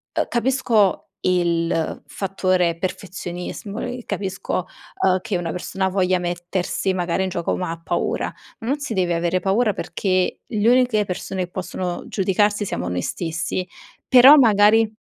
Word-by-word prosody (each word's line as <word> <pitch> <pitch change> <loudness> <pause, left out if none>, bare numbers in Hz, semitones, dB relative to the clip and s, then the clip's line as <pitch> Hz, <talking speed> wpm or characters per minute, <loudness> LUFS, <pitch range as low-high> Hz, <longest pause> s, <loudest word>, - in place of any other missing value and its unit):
uhm, - - +1
capisco 235 -5 +2 0.2
il 170 -2 0
fattore 185 -3 0
perfezionismo, 185 +2 -5
uhm, - - -3
e - - -11
capisco, 190 -2 -3 0.4
uhm, 185 -1 +4
che 195 - -3
una 170 -2 -3
persona 190 +1 -2
voglia 185 -1 +2
mettersi 175 +2 -2
magari 180 +1 0
in 190 - -1
gioco 170 -1 -2
ma 180 -3 -3
ha 165 0 -7
paura. - - -2 0.3
Non 270 +6 -2
si 270 -5 -4
deve 180 -3 +1
avere 175 +2 0
paura, 210 +2 +2
perché 185 -1 -1
gli 215 -2 -1
uniche 245 -4 +4
persone 185 0 -4
possono 180 0 -5
giudicarsi 205 +2 +1
siamo 90 - -3
noi 90 0 -2
stessi; 170 - -3 0.4
però 265 +4 +9
magari 220 -2 +5
185 Hz, 145 wpm, -22 LUFS, 175-210 Hz, 0.4 s, però